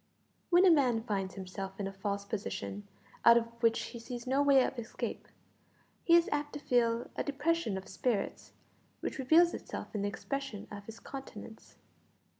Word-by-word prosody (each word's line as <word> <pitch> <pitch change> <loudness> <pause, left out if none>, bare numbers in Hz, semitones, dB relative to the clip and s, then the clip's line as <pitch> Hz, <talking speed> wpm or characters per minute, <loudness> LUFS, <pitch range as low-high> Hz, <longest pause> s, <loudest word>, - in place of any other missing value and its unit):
When 355 +2 +6
a 365 - +8
man 250 -8 +3
finds 195 -4 -2
himself 195 0 -6
in 200 - -1
a 195 - -4
false 200 +1 -3
position, 205 0 -4 0.4
out 235 0 +8
of 235 - +2 0.2
which 230 -1 +4
he 235 - -7
sees 240 0 -7
no 265 +2 +2
way 280 -2 +6
of 255 - -4
escape, 225 - -5 0.8
he 335 - +6
is 340 0 +5
apt 290 0 -1
to 290 - -5
feel 235 -3 +1
a - - -1
depression 290 - 0
of 190 - -7
spirits 220 +1 -2 0.5
which - - -4
reveals 325 +6 +5
itself - - -6
in 210 - -2
the 205 - 0
expression 275 -1 -5
of 200 -1 -8
his 225 0 -9
countenance. 225 -5 -10
235 Hz, 175 wpm, -32 LUFS, 205-280 Hz, 0.8 s, a